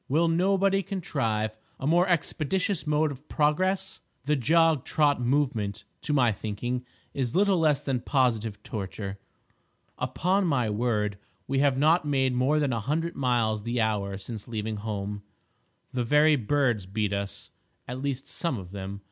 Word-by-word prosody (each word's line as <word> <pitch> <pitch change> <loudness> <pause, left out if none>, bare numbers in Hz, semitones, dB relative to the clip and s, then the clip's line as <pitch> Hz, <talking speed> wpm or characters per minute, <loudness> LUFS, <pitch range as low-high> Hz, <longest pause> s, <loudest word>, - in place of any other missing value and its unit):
Will 160 +5 +3
nobody 195 +3 +2
contrive 115 - -2 0.2
a 135 - -4
more 175 +5 +4
expeditious 175 +1 0
mode 150 0 +2
of 140 +2 -11
progress? 185 +6 +1 0.2
The 150 +2 +1
jog 160 +2 +3
trot 145 -4 +2
movement, 120 -6 0 0.2
to - - -3
my 125 -5 +4
thinking, 115 +4 -3 0.3
is 130 0 -2
little 195 -1 +4
less 150 -3 +3
than 135 -4 -1
positive 115 -6 0
torture. 100 -1 -5 0.8
Upon 185 +2 +1
my 125 -8 +1
word 105 -2 0 0.3
we 135 0 0
have 140 -2 +3
not 160 +5 +4
made 135 -3 +1
more 130 +5 +2
than 145 -4 +1
a 115 - 0
hundred 160 +9 -2
miles 120 -5 +1
the 120 +3 -2
hour 100 -3 0
since 105 +2 -8
leaving 110 -2 -3
home! 105 -1 -4 0.7
The 125 -2 -1
very 150 +5 +5
birds 120 -5 +1
beat 105 +1 -1
us—at 100 +5 -7
least 135 -1 -2
some 165 -8 -2
of 90 -3 -9
them. 100 0 -6
130 Hz, 150 wpm, -27 LUFS, 110-155 Hz, 0.8 s, very